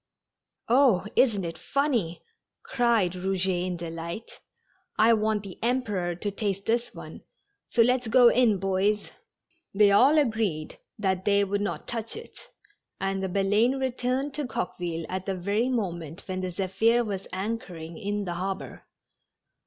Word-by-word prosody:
"Oh, 240 -7 +4
isn't 215 -7 +3
it 165 -1 -6
funny," 235 - -1 0.4
cried 235 -7 +2
Eouget 185 0 -1
in 180 -1 -3
delight. 170 +5 -7 0.6
"I 225 +2 +6
want 215 -1 +1
the 195 -3 -10
Emperor 210 -8 0
to 205 +4 -3
taste 200 -1 -3
this 235 +1 0
one, - - -10 0.5
so 230 - +4
let's 250 0 +1
go 245 +2 +6
in, 235 -5 +3
boys." 195 +2 0 0.6
They 205 0 +6
all 265 +10 +6
agreed 220 - 0 0.2
that 190 -2 0
they 200 0 +4
would 200 +1 -1
not 205 - -3
touch 230 -1 -3
it, 455 - -11 0.5
and 195 0 -1
the 190 - -2
Baleine 205 +7 +2
returned 260 +2 -1
to 295 -2 -3
Coqueville 175 -6 -3
at 185 +1 -4
the 195 - -1
very 200 +7 0
moment 175 - -3
when 185 -1 -3
the 185 -1 -3
Zephir 200 +6 +2
was 195 -2 -4
anchoring 185 -5 -5
in 205 -1 -3
the 175 - -3
harbor. 190 +2 -5
200 Hz, 145 wpm, -27 LUFS, 185-230 Hz, 0.6 s, I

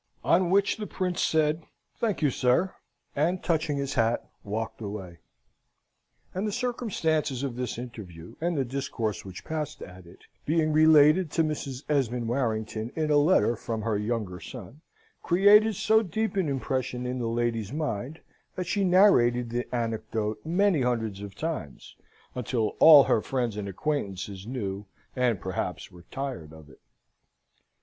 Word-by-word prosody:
On 175 0 +3
which 200 +2 +2
the 210 -1 -5
Prince 180 -2 -2
said, 155 0 +1 0.3
"Thank 215 -8 -1
you, 145 - +3
sir," 130 +10 +1 0.4
and, 170 +6 0
touching 155 -3 0
his 140 -1 -2
hat, 115 0 +1 0.2
walked 110 +3 -4
away. 100 -5 -7 1.1
And 190 +4 -2
the - - -1
circumstances 175 - -1
of 135 -4 -3
this 125 -2 -4
interview, 100 -9 -9
and 170 -1 0
the 135 - +1
discourse 115 -5 -3
which 95 -2 -10
passed 155 -2 -4
at 90 -1 -12
it, 85 - -16 0.2
being 155 0 +1
related 155 +2 +6
to 165 - +3
Mrs. 145 -3 -4
Esmond 125 -5 0
Warrington 110 -2 -2
in 155 -1 0
a 145 - +5
letter 145 - +4
from 110 -1 -4
her 110 -1 0
younger 105 -3 -2
son, 125 - -10 0.4
created 205 +4 +5
so 220 +4 +3
deep 220 +3 -2
an 185 -6 +1
impression 130 -1 -2
in 125 +1 -3
that 120 - -2
lady's 115 -2 -1
mind, 145 -1 -4 0.3
that 185 - -3
she 195 +3 0
narrated 125 - +4
the 120 +1 -2
anecdote 110 -2 -2
many 180 -1 +2
hundreds 115 -5 -1
of 100 -1 -8
times 150 - -5 0.4
until 115 -3 -1
all 150 -3 +10
her 110 - +2
friends 120 -4 -2
and 100 -1 -4
acquaintances 100 - -3
knew 105 -5 -4 0.3
and, 125 -6 +1
perhaps, 95 -1 -4
were 90 0 -15
tired 130 - -5
of 80 -2 -14
it. - - -20
125 Hz, 155 wpm, -27 LUFS, 110-160 Hz, 1.1 s, all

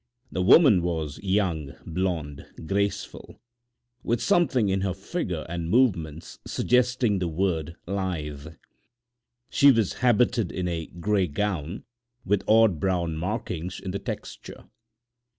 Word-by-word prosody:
The 90 - -2
woman 105 - +6
was 80 -4 -3
young, 95 -8 -1
blonde, 80 -5 -3 0.2
graceful, 100 +4 -3 0.6
with 120 0 0
something 160 - +2
in 95 0 0
her 95 -2 -1
figure 95 - -4
and 85 -1 -4
movements 85 - 0
suggesting 125 -4 +1
the 90 - -1
word 85 -1 -1
"lithe." 80 -7 -4 1.0
She 140 0 +6
was 115 -6 +1
habited 120 -4 +2
in 90 -1 -3
a 80 -2 -3
gray 95 +2 0
gown 85 +1 -3 0.4
with 100 0 +1
odd 110 -6 +5
brown 85 -2 0
markings 90 -1 -4
in 95 - -5
the 100 - -3
texture. - - -7
95 Hz, 120 wpm, -26 LUFS, 85-105 Hz, 1.0 s, woman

